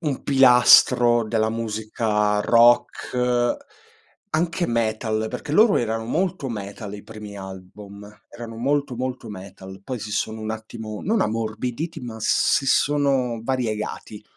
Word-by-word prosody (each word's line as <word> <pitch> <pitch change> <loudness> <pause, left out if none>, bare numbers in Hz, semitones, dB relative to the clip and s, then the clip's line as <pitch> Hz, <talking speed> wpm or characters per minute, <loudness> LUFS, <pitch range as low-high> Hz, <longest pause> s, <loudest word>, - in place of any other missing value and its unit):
un 150 -6 -3
pilastro 125 -3 +6
della 110 0 0
musica 110 -1 -1
rock, 120 +1 +2 0.7
anche 170 +2 0
metal, 110 -1 -1
perché 125 +3 -6
loro 215 +5 +5
erano 115 -1 -2
molto 170 +3 -2
metal 100 -1 -7
i 100 - -9
primi 105 -2 -10
album, 100 +2 -10 0.2
erano 115 -1 -9
molto, 140 +2 -1
molto 130 0 -4
metal. 95 -1 -10
Poi 125 +4 -5
si 105 -1 -7
sono 110 +1 -2
un 110 - -4
attimo 110 -1 -7
non 220 +2 +1
ammorbiditi, 115 +8 -3
ma 120 -3 -7
si 135 +4 +2
sono 135 -4 +1
variegati. 110 -4 -4
115 Hz, 125 wpm, -23 LUFS, 110-130 Hz, 0.7 s, pilastro